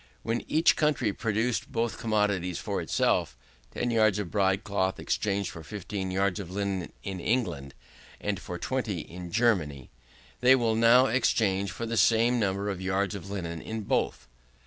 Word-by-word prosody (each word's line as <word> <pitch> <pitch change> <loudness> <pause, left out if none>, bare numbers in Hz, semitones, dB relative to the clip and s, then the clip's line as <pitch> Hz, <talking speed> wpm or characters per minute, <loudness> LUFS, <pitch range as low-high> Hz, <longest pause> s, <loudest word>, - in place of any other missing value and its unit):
When 115 +1 -1
each 160 +2 +4
country 145 -9 +1
produced 115 +2 -1
both 115 0 -1
commodities 105 -6 0
for - - -3
itself, 75 -8 +1 0.4
10 120 - -1
yards 110 -3 +3
of 100 -5 -4
broad 100 0 +2
cloth 95 -2 -1
exchanged 100 -1 -1
for 85 - -9
15 100 -1 -5
yards 95 +1 0
of 95 -4 -6
linen 95 -2 -3
in 95 -2 -4
England, 85 - -1 0.4
and 100 -2 -2
for 90 - -6
20 110 -5 -2
in 90 +2 -9
Germany. 85 - +1 0.5
They 125 +1 +6
will 115 -3 +1
now 115 +3 +6
exchange 105 -6 +1
for 115 - -5
the 115 0 -2
same 115 +2 +4
number 100 -1 0
of 95 -3 -3
yards 95 +1 0
of 100 -1 -7
linen 85 -5 -4
in 110 0 -5
both. 100 - -1
100 Hz, 165 wpm, -28 LUFS, 95-115 Hz, 0.5 s, They